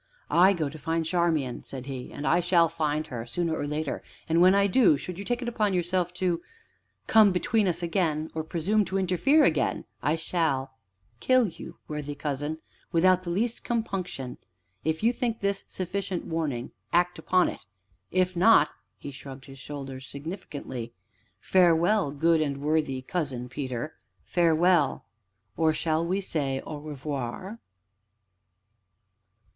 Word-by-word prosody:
"I 185 +3 +6
go 160 -5 -1
to 155 +3 -8
find 165 +2 -1
Charmian," 160 -7 0
said 130 -2 -8
he, 130 -2 -6
"and 145 - -6
I 165 +6 +4
shall 175 -1 +4
find 155 -2 -1
her 120 -3 -5
sooner 160 +8 -2
or 145 - -3
later, 150 -1 -2 0.3
and, 165 +1 +3
when 185 +2 +7
I 200 0 +4
do, 200 - +5
should 180 +5 -7
you - - -4
take 245 +4 -2
it - - -5
upon 210 -5 +1
yourself 180 0 0
to 175 -2 0 0.6
come 215 -2 +6
between 195 +4 +1
us 175 0 0
again, 160 -3 0
or 160 - -2
presume 175 +7 +1
to 190 +2 -2
interfere 195 - +3
again, - - +1 0.2
I 150 - +2
shall 160 -5 -1 0.5
kill 255 - +4
you, 165 - -10
worthy 150 -1 -4
cousin, 145 +2 -3 0.3
without 185 +1 +4
the 180 - -6
least 225 +7 -1
compunction. 185 - -3 0.4
If 160 +4 -1
you 235 +2 +4
think 235 -2 -2
this 200 0 -1
sufficient 190 0 -3
warning 150 -7 -2 0.2
act 175 0 +2
upon 185 0 +3
it, - - -6 0.5
if 185 0 +1
not 175 -5 +6
" - - -50
He 140 - -8
shrugged 135 -1 -10
his 135 0 -12
shoulders 135 -2 -7
significantly. 140 - -6 0.5
"Farewell, 175 - +3
good 160 +3 +2
and 140 -2 -1
worthy 145 -3 0
Cousin 130 -6 -3
Peter, 130 +2 -4 0.3
farewell! 170 -3 +3 0.5
or 160 -1 +3
shall 160 +1 0
we 185 +4 0
say 140 -7 -1
'au 155 - -5
revoir'?" 150 - -5
165 Hz, 150 wpm, -27 LUFS, 145-185 Hz, 0.6 s, when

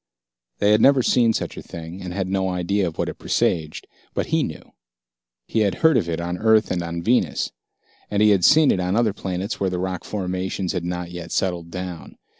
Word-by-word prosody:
They 105 0 +3
had 105 +1 +4
never 135 -2 +5
seen 120 -2 +4
such - - -3
a - - -5
thing 85 +2 -9
and 90 - -6
had 95 0 -2
no 95 0 0
idea 90 +2 0
of 80 - -6
what - - -1
it - - -6
presaged, 80 -2 -1 0.3
but - - 0
he - - +1
knew. - - -6 0.7
He 115 - -1
had 100 -4 +2
heard 160 -2 +6
of 90 -9 +1
it 80 -1 -2
on 90 +1 -3
Earth 110 -1 +3
and 90 - 0
on 85 0 -4
Venus, 120 +5 +1 0.6
and 100 - 0
he 105 - +6
had 95 -3 +3
seen 150 - +6
it - - 0
on 90 +1 0
other 115 -3 +2
planets 95 +2 -4
where 95 - +1
the 90 - -3
rock 90 -1 -3
formations 95 -1 -3
had 90 -3 -2
not 90 0 -4
yet 85 -1 -7
settled 90 -3 -1
down. 90 -2 -7
95 Hz, 220 wpm, -22 LUFS, 90-105 Hz, 0.7 s, heard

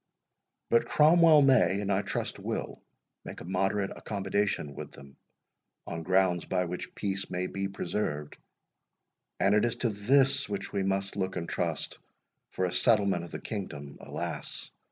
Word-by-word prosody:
But 115 - +4
Cromwell 160 -1 +6
may, 130 -7 +4
and 100 -1 -1
I 95 +1 +2
trust 105 - -3
will, - - -4 0.4
make - - -8
a - - -9
moderate 95 +2 0
accommodation 100 -6 -1
with - - -8
them, 70 -1 -14 0.7
on 85 0 -5
grounds 90 0 +2
by 90 -1 0
which 90 +1 -6
peace 100 -1 -3
may 90 0 -2
be 95 +1 -3
preserved; 75 -7 -3 1.0
and 100 - +4
it 105 - +4
is 120 0 +1
to 120 0 0
this 130 +7 +3
which 100 -1 -4
we 100 - 0
must 95 +1 -1
look 95 -1 -1
and 85 - -3
trust - - -2 0.5
for 95 - -1
a 90 - -2
settlement 100 -2 +3
of 85 - -12
the - - -5
kingdom, 75 -9 -6
alas! - - -5
95 Hz, 155 wpm, -29 LUFS, 90-105 Hz, 1.0 s, Cromwell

